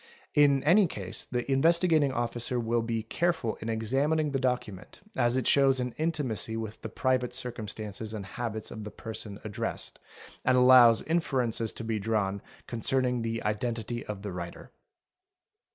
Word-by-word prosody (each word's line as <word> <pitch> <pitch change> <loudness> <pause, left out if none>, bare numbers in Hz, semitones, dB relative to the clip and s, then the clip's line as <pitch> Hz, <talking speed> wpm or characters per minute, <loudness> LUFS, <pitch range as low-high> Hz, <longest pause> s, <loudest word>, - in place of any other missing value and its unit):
In 140 -2 +4
any 180 +6 +5
case 95 - -5
the 125 -1 -3
Investigating 160 0 +4
Officer 120 0 -1
will 115 0 0
be 115 -1 -2
careful 160 -1 -1
in 110 - -4
examining 140 +8 0
the 135 - 0
docu 125 -5 -1
ment, 95 +1 -13 0.2
as 120 -3 +2
it 130 - -1
shows 135 -2 +4
an 125 -1 -2
intimacy 145 -9 -1
with 110 -1 -6
the - - -5
private 130 -2 0
circumstances 110 -4 -4
and 105 -3 -5
habits 110 +1 -4
of 110 - -7
the 105 - -6
person 110 -2 -7
addressed, 105 -2 -4 0.4
and 125 - +3
allows 125 -3 +7
inferences 125 -9 0
to - - -5
be 110 -1 -1
drawn 100 -2 -1 0.2
concerning 125 +1 +1
the 115 0 -3
identity 115 +2 -2
of 100 -2 -6
the 100 - -4
writer. 85 -1 -7
120 Hz, 155 wpm, -29 LUFS, 110-130 Hz, 0.4 s, allows